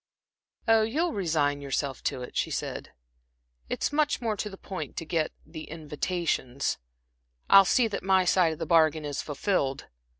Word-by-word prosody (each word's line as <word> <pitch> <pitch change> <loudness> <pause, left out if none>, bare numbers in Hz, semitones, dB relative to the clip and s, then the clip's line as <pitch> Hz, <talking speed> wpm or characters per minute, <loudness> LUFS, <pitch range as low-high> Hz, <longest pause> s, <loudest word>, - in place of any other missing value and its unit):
"Oh, 225 -1 +6
you'll 305 +10 0
resign 155 -6 0
yourself 140 0 -2
to 125 - -1
it," - - -10
she - - 0
said. - - -4 0.8
"It's - - -1
much 295 0 +2
more 225 -3 -1
to 210 - -4
the 195 - -10
point 190 -1 -7
to 165 - -3
get 160 0 0
the 155 0 -8
invitations. 155 -4 -2 0.7
I'll 195 0 +9
see 240 +5 +3
that 210 - -4
my 190 -1 +3
side 175 -2 +3
of - - -9
the - - -3
bargain 160 -2 +3
is 145 -1 -3
fulfilled." 145 -2 -1
165 Hz, 165 wpm, -28 LUFS, 145-200 Hz, 0.8 s, I'll